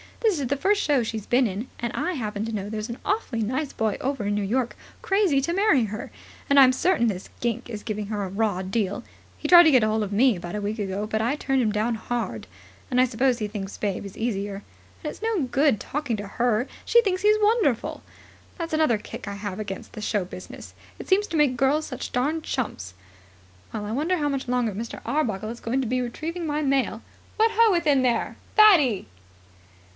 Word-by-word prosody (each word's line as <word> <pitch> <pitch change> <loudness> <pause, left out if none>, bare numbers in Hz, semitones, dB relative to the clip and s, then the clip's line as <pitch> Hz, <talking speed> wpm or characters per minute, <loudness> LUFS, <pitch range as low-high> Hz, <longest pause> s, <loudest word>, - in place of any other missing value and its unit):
This 425 -9 +2
is 270 - -1
the 280 +3 0
first 405 +6 +2
show 280 -5 +2
she's 220 -2 -5
been 250 +1 +3
in. 210 +3 -3
And 235 -1 -3
I 365 - -1
happen 215 -7 -3
to 225 - -4
know 205 -2 -4
there's 215 +1 -4
an 235 - -5
awfully 330 - -1
nice 260 +6 -2
boy 220 -2 -1
over 270 -5 -2
in 205 - 0
New 205 - 0
York 240 +4 -1 0.3
crazy 385 -9 +2
to 340 +5 -1
marry 355 - +3
her. 215 +1 -6 0.4
And 280 0 +6
I'm 260 -1 +7
certain 325 -2 +2
this 190 -4 -3
gink 235 0 -2
is 210 -3 -6
giving 210 -2 -4
her 210 -1 -2
a - - -3
raw 200 -1 0
deal. 200 +3 -2 0.3
He - - -4
tried 350 -1 +10
to 320 - +5
get 255 -5 +5
hold 215 0 +1
of 205 - -5
me 230 +1 +4
about 175 +2 -6
a 210 - -2
week 210 +2 -3
ago, 200 +1 -2
but 220 0 -1
I 240 +6 +1
turned 270 -3 0
him 220 -3 +1
down 215 +3 0
hard; 225 - -4 0.4
and 250 - +1
I - - +5
suppose 255 +1 +1
he 215 -3 -2
thinks 200 -2 -6
Babe 200 -2 -2
is 195 - -9
easier. 205 -3 -3 0.4
And 300 - -2
it's - - -14
no 445 -5 0
good 270 -1 +2
talking 280 -6 -3
to 205 0 -6
her; 240 +3 0 0.2
she 475 - +5
thinks 370 -3 0
he's 425 +1 +5
wonderful. 415 - +1 0.6
That's 335 -2 -4
another 310 -8 +3
kick 210 - -9
I 200 - -3
have 200 -1 -5
against 200 -3 -6
the 215 - -7
show 205 -2 0
business. 180 0 -10 0.2
It - - -9
seems 400 +2 +3
to 330 - -2
make 280 -4 +3
girls 285 +4 +2
such 255 - -6
darned 300 +6 0
chumps. 95 - -4 0.8
Well, 210 -2 -4
I 210 - -4
wonder 315 +10 0
how 295 -2 0
much 275 -2 -3
longer 245 -2 +1
Mr. 225 +4 -6
Arbuckle 220 -8 -1
is 235 +1 -7
going 255 +4 -1
to 255 - -2
be 255 +2 0
retrieving 320 +8 -4
my 300 0 -1
mail. 270 -6 0 0.3
What 445 +1 +4
ho, 455 0 +5
within 300 -7 +3
there, 240 -3 0 0.2
Fatty!" 320 - +6
245 Hz, 220 wpm, -25 LUFS, 210-295 Hz, 0.8 s, tried